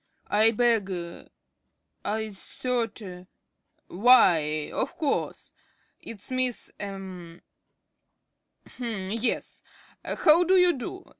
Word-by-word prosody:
~ - - -45
I 215 +2 +4
beg 225 -3 +1 1.1
I 220 +1 -2
thought 235 +3 -4 0.8
why, 175 -9 +4
of - - -3
course! 305 -4 -2 0.5
It's 220 +1 -9
Miss 255 -2 +1
er 200 -1 -5 1.7
h'm, 215 -6 -5
yes. 230 +3 -1 0.4
How 320 +3 +4
do 370 +2 +3
you 360 -1 +5
do? 335 +8 -7
230 Hz, 90 wpm, -26 LUFS, 205-255 Hz, 1.7 s, you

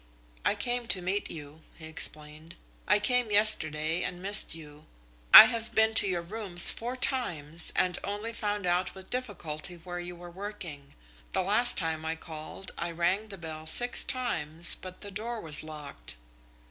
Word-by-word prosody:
"I - - 0
came 245 -1 -3
to 190 - -1
meet 195 +3 -3
you," 150 0 -10
he 160 - -12
explained. 155 0 -4 0.3
"I 205 - +3
came 245 +2 0
yesterday 165 -6 +1
and 180 -1 -5
missed 195 -2 +3
you. 150 -1 -14 0.4
I - - +12
have 230 0 -5
been 220 0 +2
to 215 - +3
your 175 -2 -3
rooms 190 -2 +6
four 240 +3 -6
times 175 - -2
and 180 -1 -1
only 205 +3 -5
found 205 -3 -4
out 180 +2 -2
with 190 0 -15
difficulty 180 -10 -6
where 175 +1 -9
you 175 0 -9
were 175 0 -13
working. 175 -7 -10 0.4
The 190 - -1
last 235 +6 +5
time 160 -2 -2
I 160 0 -4
called, 160 +3 -10
I 170 - -4
rang 175 +6 -2
the 200 -2 -9
bell 160 -2 -10
six 245 +9 +6
times, 170 - 0
but 185 -1 -8
the 205 - -10
door 225 +4 -6
was 155 -6 +1
locked." 150 - -9
180 Hz, 170 wpm, -27 LUFS, 160-210 Hz, 0.4 s, I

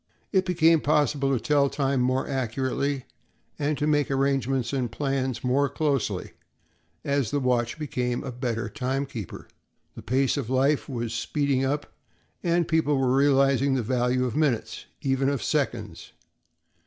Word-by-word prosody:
It 190 -2 +2
became 165 -3 +4
possible 145 -2 +2
to 130 - +1
tell 140 +3 +2
time 135 -2 0
more 130 +1 +1
accurately 135 +1 -2 0.5
and 145 0 0
to 150 - 0
make 145 -1 +2
arrangements 135 -2 0
and 125 -4 -1
plans 135 -1 -2
more 135 +3 +2
closely 140 -7 -1 0.7
as 140 -5 +1
the 145 - 0
watch 125 -1 0
became 125 -5 -2
a 135 - -5
better 120 -1 -3
time 135 0 -2
keeper. 115 -9 -8 0.5
The - - -9
pace 130 +3 +1
of 130 -5 -3
life 135 +3 +1
was 120 -3 -3
speeding 135 +3 0
up, 145 +2 -2 0.5
and 170 -1 +1
people 160 -3 +2
were 130 -1 +2
realizing 135 -1 +3
the 125 - 0
value 125 +1 +1
of 125 - -3
minutes—even 135 0 -1
of 140 -6 -2
seconds. - - -2
135 Hz, 145 wpm, -26 LUFS, 125-145 Hz, 0.7 s, became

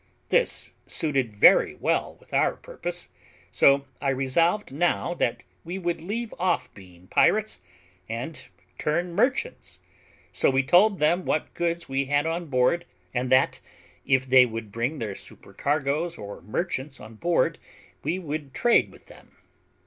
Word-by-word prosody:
This - - +1 0.2
suited 135 -7 -1
very 100 - +6
well - - -1
with - - -21
our - - +2
purpose; - - -6 0.4
so 140 0 +4 0.2
I 140 - +1
resolved 150 +9 +1
now 175 +3 0
that 120 -8 -1 0.2
we 175 +3 -5
would 175 -3 -2
leave 220 +6 -4
off 175 -8 0
being 90 -2 -16
pirates 215 - +2 0.5
and 120 +8 -5 0.4
turn 175 +3 -1
merchants; 255 - -1 0.6
so - - +3
we 135 0 +2
told 190 +8 +5
them 170 +5 +2
what 155 - -1
goods 170 0 -2
we 135 +1 -1
had 145 +2 +1
on 165 +1 -2
board, 135 +6 +2 0.3
and 125 +1 -1
that 130 0 +3 0.4
if 130 -1 +2
they 130 0 +7
would 110 -2 -6
bring 120 +8 -2
their 110 -6 -4
supercargoes 150 - -3
or 100 0 -8
merchants 135 - -3
on 110 +2 -11
board, 170 +5 +1 0.4
we 175 - -1
would 150 -5 -5
trade 240 -1 +3
with - - -18
them. - - -18
150 Hz, 145 wpm, -26 LUFS, 130-175 Hz, 0.6 s, they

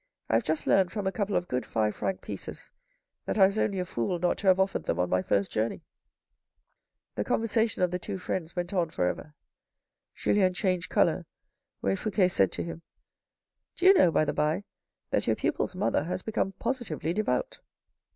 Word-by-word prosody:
I - - 0
have 115 - +4
just 155 0 -1
learned 190 -2 +3
from 205 -3 -3
a 190 - +1
couple 205 0 -2
of 180 - 0
good 125 -1 -1
five 110 -1 0
franc 190 - -2
pieces - - -7 0.5
that - - -2
I 195 - +8
was 200 +3 0
only 200 - +1
a 180 - -1
fool 170 +3 -1
not 175 +1 0
to 200 - -3
have 185 0 +6
offered 190 0 +1
them 85 - 0
on 90 0 0
my 90 0 +3
first 100 +1 0
journey." 110 +1 -1 1.3
The 105 - -1
conversation 225 - +1
of 180 - +2
the 180 - -2
two 195 +2 -4
friends 175 -2 -4
went 175 +1 -3
on 175 -4 +1
for 125 - -1
ever. 150 +11 -3 0.8
Julien 185 -3 +2
changed 180 -3 0
coloured - - +2 0.5
when 95 0 +1
Fouque 190 -3 +1
said 95 - +3
to - - -2
him, 170 0 -7 0.5
" - - -60
Do 360 - -2
you 385 - +10
know, 265 - +5
by 155 - +2
the - - -1
by, 155 +6 0 0.5
that - - +1
your - - +3
pupils' - - -1
mother 185 -5 +1
has 185 +2 -3
become 205 -3 -1
positively 220 - -2
devout." 215 - -1
180 Hz, 200 wpm, -28 LUFS, 155-200 Hz, 1.3 s, you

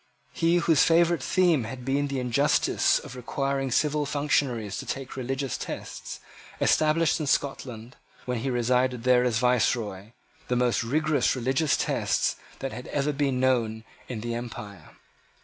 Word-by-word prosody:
He, 165 +1 +2
whose 165 -5 +3
favourite 170 -1 +3
theme 170 -6 +2
had 125 +2 -7
been 140 +2 0
the 135 -1 -2
injustice 125 +4 +2
of 125 - -8
requiring 135 +2 -2
civil 150 +3 +1
functionaries 135 -8 0
to - - -6
take 135 -2 -5
religious 135 +1 -3
tests, - - -6 0.4
established 155 +2 +3
in 155 - -3
Scotland, 125 -4 -2 0.3
when 125 -2 -2
he 135 +4 -2
resided 125 0 +1
there 125 -1 +4
as 120 -3 +1
Viceroy, 115 -4 0 0.3
the 125 - 0
most 120 -1 +1
rigorous 155 +5 +1
religious 135 +4 +1
test - - 0 0.2
that 135 - -3
has 125 +3 -8
ever 145 +1 -1
been 135 -2 0
known 115 -4 +1 0.2
in 120 -4 -5
the 120 +1 -3
empire. 105 -7 -7
130 Hz, 150 wpm, -26 LUFS, 120-145 Hz, 0.4 s, there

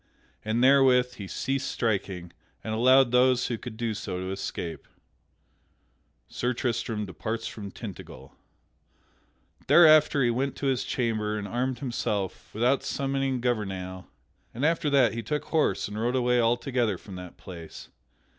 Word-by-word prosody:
And 110 +3 0
therewith 130 -2 +5
he 100 - -7
ceased 135 +7 -2
striking, 95 -6 -2 0.3
and 110 - -3
allowed 130 +2 +5
those 125 0 +4
who 120 - -2
could 115 -3 -8
do 115 -1 -1
so 95 -3 -5
to 95 +1 -4
escape. 85 -4 -5 1.4
[Sidenote: - - -48
Sir 125 +1 -2
Tristram 115 -3 -2
departs 110 +6 -4
from 100 -2 -6
Tintagel] 95 - -10 1.4
Thereafter 155 -4 +6
he 120 - +3
went 135 +3 -1
to - - -5
his 130 -2 +1
chamber 110 -4 -1
and 100 -1 -4
armed 125 +4 -1
himself 105 -7 -3
without 125 +5 +2
summoning 135 -2 -1
Gouvernail, 95 -6 -3 0.5
and 130 +5 -1
after 160 -2 +1
that 130 -6 +4
he 115 - -3
took 150 +7 -3
horse 160 -2 +1
and 105 +1 -6
rode 120 +2 0
away 125 -1 +2
altogether 120 -2 +1
from 100 - -12
that 90 -1 -10
place. 85 -3 -10
120 Hz, 145 wpm, -27 LUFS, 105-130 Hz, 1.4 s, Thereafter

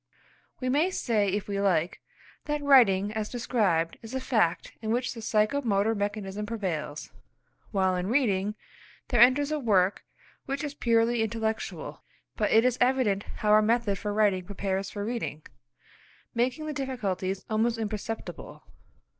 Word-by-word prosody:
We 255 - -3
may 295 +8 +2
say, 225 - 0
if 200 +1 -2
we 200 -1 -2
like, 180 -3 +1 0.4
that 295 -1 -2
writing 210 -8 +5
as 215 -1 -3
described 205 -9 0
is 225 +3 -8
a - - 0
fact 220 -10 0
in 220 - -4
which 245 +3 0
the 230 - -8
psycho 220 +5 +1
motor 215 -2 +1
mechanism 205 -1 -3
prevails, 180 -9 -4 0.6
while 190 -2 +1
in 180 +1 -2
reading, 210 -5 +1 0.5
there 240 -3 +3
enters 275 +4 +5
a 305 - 0
work 200 -6 +2 0.4
which 275 +2 -3
is 290 -1 -4
purely 235 -3 +2
intellectual. 220 0 -3 0.3
But - - 0
it 225 +2 +5
is 255 -1 +1
evident 245 -6 +2 0.2
how 210 - +2
our 215 0 +7
method 220 -3 +1
for 210 - -3
writing 205 -3 +2
prepares 195 0 -3
for 205 -1 -5
reading, 225 -10 -4 0.9
making 250 +6 0
the 305 - -3
difficulties 200 -9 -3
almost 225 +2 +1
imperceptible. 220 0 -5
220 Hz, 150 wpm, -28 LUFS, 200-245 Hz, 0.9 s, our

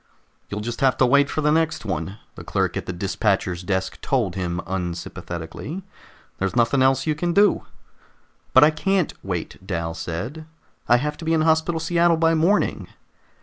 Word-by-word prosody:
"You'll 105 +1 -4
just 120 +2 -5
have 135 -2 +3
to 130 - +4
wait 140 +2 +4
for 155 - -2
the 150 0 +3
next 160 -5 +1
one," 95 0 -3 0.2
the - - -10
clerk - - -1
at - - -4
the - - -2
dispatcher's 95 -1 -1
desk 95 0 -2
told 120 -10 0
him 90 -2 -2
unsympathetically. 90 - -5 0.6
"There's 95 +3 -1
nothing 120 +3 +3
else 130 0 +3
you 155 - +1
can 170 +3 -1
do." 205 +2 +3 0.8
"But 130 - +7
I 150 - +6
can't 185 +3 0
wait," 90 -4 -4
Dal 85 -3 -3
said. 90 - -5 0.4
"I 120 - +7
have 150 +4 -2
to 165 - -8
be 165 - +1
in 160 - +2
Hospital 160 +1 +2
Seattle 170 0 +2
by 165 0 +3
morning." 170 +6 +1
130 Hz, 175 wpm, -23 LUFS, -, 0.8 s, But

